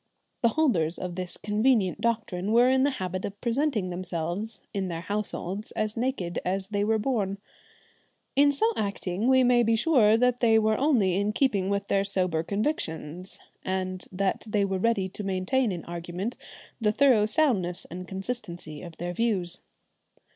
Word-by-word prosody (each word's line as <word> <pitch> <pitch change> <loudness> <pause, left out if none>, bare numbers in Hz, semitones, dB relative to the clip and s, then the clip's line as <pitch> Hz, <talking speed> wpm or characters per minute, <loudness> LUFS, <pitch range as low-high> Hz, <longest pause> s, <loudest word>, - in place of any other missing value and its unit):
The 235 - +5
holders 180 - +2
of 180 -1 -4
this 180 0 -5
convenient 210 -2 +1
doctrine 215 -4 -1
were 245 +2 +6
in 260 0 +3
the 280 - +4
habit 185 0 -3
of 200 0 -5
presenting 235 -6 0
themselves 180 +4 -3
in 195 -2 -1
their 165 -2 -4
households 205 0 -3
as 215 0 -2
naked 230 -8 -2
as 190 +1 -2
they 205 -1 0
were 220 +1 +2
born. 210 -4 -1 1.0
In 285 +1 +5
so 445 +11 +1
acting 200 0 -2
we 260 0 +5
may 245 -1 +5
be 225 -1 +3
sure 225 -5 +4
they 240 -2 +3
were 220 0 +3
only 240 - +3
in 205 +1 0
keeping 205 -8 +1
with 200 0 0
their 195 0 +2
sober 185 -5 0
convictions, 180 - -3 0.2
and 185 -1 -3
that 190 +1 -1
they 210 -1 +1
were 190 -1 -1
ready 205 -2 +1
to 205 - -7
maintain 195 +6 0
in 175 -3 -5
argument 175 +6 -4 0.5
the 210 -1 +3
thorough 235 -3 +4
soundness 215 - +1
and 180 +1 -7
consistency 190 -7 -6
of 170 -2 -10
their 175 +1 -4
views. 185 -5 -1
200 Hz, 160 wpm, -27 LUFS, 185-235 Hz, 1.0 s, were